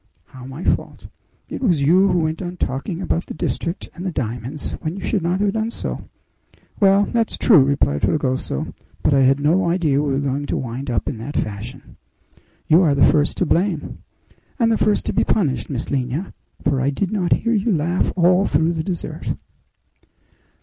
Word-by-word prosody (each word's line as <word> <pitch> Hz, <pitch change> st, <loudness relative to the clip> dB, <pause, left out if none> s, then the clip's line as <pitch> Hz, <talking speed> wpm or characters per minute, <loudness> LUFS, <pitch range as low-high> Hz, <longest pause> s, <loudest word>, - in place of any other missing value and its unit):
"How 130 Hz, -1 st, -11 dB
my 135 Hz, +6 st, -8 dB
fault?" -, -, -1 dB, 0.4 s
"It -, -, -6 dB
was 175 Hz, -, +2 dB
you 180 Hz, +7 st, +5 dB
who 180 Hz, -3 st, +2 dB
went 155 Hz, +3 st, -2 dB
on 180 Hz, -1 st, -5 dB
talking 150 Hz, +8 st, -3 dB
about 170 Hz, -, -1 dB
the -, -, -7 dB
district 170 Hz, +3 st, -3 dB
and 180 Hz, -, -8 dB
the 185 Hz, -, -2 dB
diamonds, 125 Hz, +1 st, -4 dB
when 155 Hz, +3 st, -3 dB
you 195 Hz, -, -7 dB
should 200 Hz, -, 0 dB
not 175 Hz, +3 st, 0 dB
have 205 Hz, -1 st, +1 dB
done 220 Hz, 0 st, -1 dB
so." -, -, -5 dB, 0.7 s
"Well, 200 Hz, -1 st, +5 dB
that's 230 Hz, 0 st, -1 dB
true," 180 Hz, -, +6 dB
replied 135 Hz, -, +1 dB
Fragoso; 130 Hz, -, -1 dB, 0.3 s
"but 150 Hz, -, +3 dB
I 135 Hz, -, +4 dB
had 135 Hz, +1 st, +4 dB
no 170 Hz, +5 st, +2 dB
idea 160 Hz, -5 st, +2 dB
we 145 Hz, -1 st, -1 dB
were 135 Hz, -, +1 dB
going 140 Hz, +1 st, -2 dB
to -, -, -1 dB
wind 130 Hz, +2 st, -5 dB
up 115 Hz, -5 st, -1 dB
in 110 Hz, -, -3 dB
that 140 Hz, +6 st, -5 dB
fashion." 110 Hz, +6 st, -5 dB, 0.7 s
"You 160 Hz, +4 st, +6 dB
are 150 Hz, -6 st, +3 dB
the 140 Hz, -, +5 dB
first 150 Hz, -1 st, +2 dB
to 185 Hz, -, +1 dB
blame!" 175 Hz, -1 st, 0 dB, 0.6 s
"And 230 Hz, -4 st, +2 dB
the -, -, +3 dB
first 210 Hz, -1 st, +1 dB
to -, -, -1 dB
be -, -, +2 dB
punished, 155 Hz, -11 st, 0 dB
Miss 130 Hz, -4 st, -4 dB
Lina; 135 Hz, +6 st, -2 dB, 0.3 s
for 135 Hz, -2 st, +1 dB
I 135 Hz, -, +2 dB
did 175 Hz, +7 st, -2 dB
not 185 Hz, -5 st, +2 dB
hear 230 Hz, +1 st, 0 dB
you 220 Hz, +1 st, +1 dB
laugh 170 Hz, +1 st, +1 dB
all 180 Hz, +2 st, +4 dB
through 160 Hz, +3 st, +2 dB
the 160 Hz, -1 st, -2 dB
dessert." 175 Hz, -1 st, -4 dB
160 Hz, 195 wpm, -21 LUFS, 135-185 Hz, 0.7 s, true